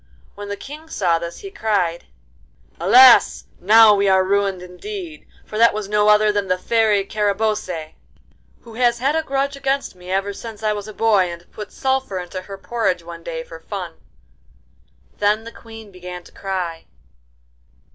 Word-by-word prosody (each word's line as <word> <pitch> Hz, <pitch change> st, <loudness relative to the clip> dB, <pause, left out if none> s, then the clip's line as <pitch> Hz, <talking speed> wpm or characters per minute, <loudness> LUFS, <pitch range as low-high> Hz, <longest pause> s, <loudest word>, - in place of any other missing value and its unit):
When 205 Hz, 0 st, -9 dB
the 205 Hz, -, -4 dB
King 305 Hz, +6 st, -10 dB
saw 175 Hz, -, +1 dB
this 170 Hz, 0 st, -7 dB
he 395 Hz, -, -8 dB
cried: 195 Hz, -, -1 dB, 0.7 s
'Alas! 245 Hz, +8 st, +6 dB, 0.2 s
now 215 Hz, +3 st, +7 dB
we 200 Hz, -1 st, +2 dB
are 190 Hz, 0 st, +4 dB
ruined 195 Hz, -1 st, 0 dB
indeed, 335 Hz, -, -8 dB, 0.2 s
for 215 Hz, -, -6 dB
that 230 Hz, -2 st, +5 dB
was 215 Hz, -2 st, -4 dB
no 210 Hz, 0 st, +2 dB
other 210 Hz, 0 st, +5 dB
than 205 Hz, -1 st, -1 dB
the 185 Hz, 0 st, +1 dB
Fairy 215 Hz, 0 st, +1 dB
Carabosse, 205 Hz, -6 st, -2 dB, 0.7 s
who 230 Hz, -, -14 dB
has 240 Hz, 0 st, +2 dB
had 275 Hz, +5 st, 0 dB
a 320 Hz, -, +2 dB
grudge 275 Hz, -1 st, -2 dB
against 275 Hz, 0 st, -2 dB
me 180 Hz, 0 st, -13 dB
ever 195 Hz, +2 st, -1 dB
since 220 Hz, +1 st, -9 dB
I 215 Hz, -1 st, +1 dB
was 205 Hz, 0 st, -6 dB
a -, -, -7 dB
boy 205 Hz, -5 st, +2 dB
and 170 Hz, 0 st, -10 dB
put 210 Hz, -1 st, -8 dB
sulphur 265 Hz, -6 st, -1 dB
into 180 Hz, +1 st, -6 dB
her 195 Hz, +1 st, -9 dB
porridge 195 Hz, -4 st, -2 dB
one 170 Hz, 0 st, -10 dB
day 165 Hz, -1 st, -5 dB
for 165 Hz, 0 st, -11 dB
fun.' 180 Hz, -2 st, -7 dB, 1.2 s
Then 210 Hz, +2 st, +2 dB
the 230 Hz, -, -9 dB
Queen 225 Hz, -3 st, -13 dB
began 180 Hz, -1 st, -9 dB
to -, -, -17 dB
cry. 180 Hz, -4 st, -4 dB
205 Hz, 170 wpm, -20 LUFS, 185-225 Hz, 1.2 s, now